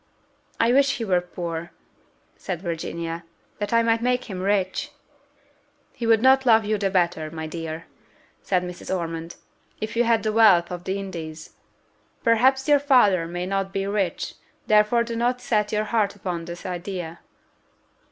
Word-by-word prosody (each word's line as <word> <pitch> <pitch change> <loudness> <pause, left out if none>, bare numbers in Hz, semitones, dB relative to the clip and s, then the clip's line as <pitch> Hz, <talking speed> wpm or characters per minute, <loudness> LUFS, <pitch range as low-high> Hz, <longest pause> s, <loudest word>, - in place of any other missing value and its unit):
"I 235 +1 +4
wish 275 0 +3
he 230 - -3
were 180 -3 +2
poor," 170 -1 -5 0.7
said 180 -4 -5
Virginia, 170 -1 -4 0.4
"that 205 - -3
I 230 0 +4
might 230 0 +2
make 250 +1 +1
him 185 -1 -4
rich." 195 +7 0 1.0
"He 235 - -4
would 225 0 +4
not 265 +1 +6
love 225 -3 +5
you 215 0 0
the 195 -1 +1
better, 175 -4 0
my 160 0 -6
dear," 165 0 -6 0.6
said 180 -2 0
Mrs. 180 0 -8
Ormond, 165 -2 -3 0.4
"if 215 +1 -4
you 240 - +3
had 230 -1 +2
the 215 -1 0
wealth 195 -7 +5
of 175 0 -6
the 190 +1 -1
Indies. 165 -5 -7 0.7
Perhaps 260 +4 +3
your 290 -1 +5
father 210 - +4
may 175 +1 -4
not 195 0 -2
be 195 0 -2
rich; 200 -3 -2 0.3
therefore 215 +2 +4
do 235 0 -5
not 245 +2 0
set 215 -4 0
your 215 0 +1
heart 215 -2 0
upon 180 -4 -4
this 170 0 -8
idea." 175 -2 -5
195 Hz, 160 wpm, -24 LUFS, 175-230 Hz, 1.0 s, not